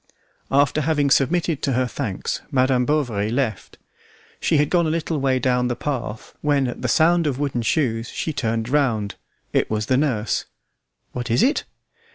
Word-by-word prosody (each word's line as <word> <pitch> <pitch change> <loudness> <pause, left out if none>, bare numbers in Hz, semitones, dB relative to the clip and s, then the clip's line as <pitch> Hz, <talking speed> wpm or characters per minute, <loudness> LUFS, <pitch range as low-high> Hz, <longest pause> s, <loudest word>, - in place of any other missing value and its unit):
After 140 +2 +3
having 145 -2 +1
submitted 165 +2 +2
to 135 - 0
her 130 +1 +2
thanks, 120 -6 -3
Madam 130 -1 +2
Bovary 120 -9 0
left. 120 -3 -2 0.6
She 155 - +2
had 145 0 +2
gone 170 -2 +3
a - - 0
little 160 -1 -1
way 135 -1 +2
down 125 0 +1
the 120 - -1
path 120 -5 -4
when, 145 -3 +2
at 120 - -6
the 125 - -1
sound 165 +6 +3
of 135 -3 -1
wooden 140 -4 -1
shoes, 115 -2 0
she 160 - -3
turned 115 -3 -1
round. 120 -7 +1 0.4
It - - +2
was 110 0 -1
the 130 +3 +2
nurse. 125 -7 0 0.7
"What 125 0 -5
is 115 - +3
it?" 280 +5 +2
130 Hz, 175 wpm, -22 LUFS, 120-150 Hz, 0.7 s, After